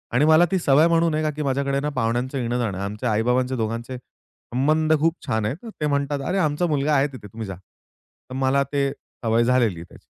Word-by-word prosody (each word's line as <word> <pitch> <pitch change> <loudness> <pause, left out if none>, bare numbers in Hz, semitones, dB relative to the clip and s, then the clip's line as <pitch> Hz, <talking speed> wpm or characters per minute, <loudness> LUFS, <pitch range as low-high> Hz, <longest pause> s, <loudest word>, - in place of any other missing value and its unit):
आणि 140 +4 +4
मला 160 +2 +6
ती 190 - +2
सवय 150 +1 +4
म्हणून 165 -1 +2
आहे, 155 0 0
का 155 - +1
की 150 - -6
माझ्याकडे 140 0 0 0.2
पाहुण्यांचं 125 +3 -1
येणं 120 -1 -1
जाणं 105 -6 -2
आहे. 100 - -3
आमचे 105 +5 -4
आई-बाबांचे 125 +4 +1
दोघांचे 115 +2 -3
संबंध 155 +5 -2
खूप 165 +1 +2
छान 110 -1 0
आहेत. 145 - -4 0.2
ते 150 - +1
म्हणतात, 140 0 -1
अरे, 195 - 0
आमचा 155 -1 +1
मुलगा 150 -1 +1
आहे 135 +2 +3
तिथे, 130 -7 -11
तुम्ही 110 +1 -7
जा. 95 - -6
तर 95 +7 -20
मला 135 +1 +2
ते 140 -1 +1 0.3
सवय 115 +1 +3
झालेली 120 -7 +2
आहे 85 - -7
त्याची. - - -16
130 Hz, 215 wpm, -23 LUFS, 115-150 Hz, 0.3 s, मला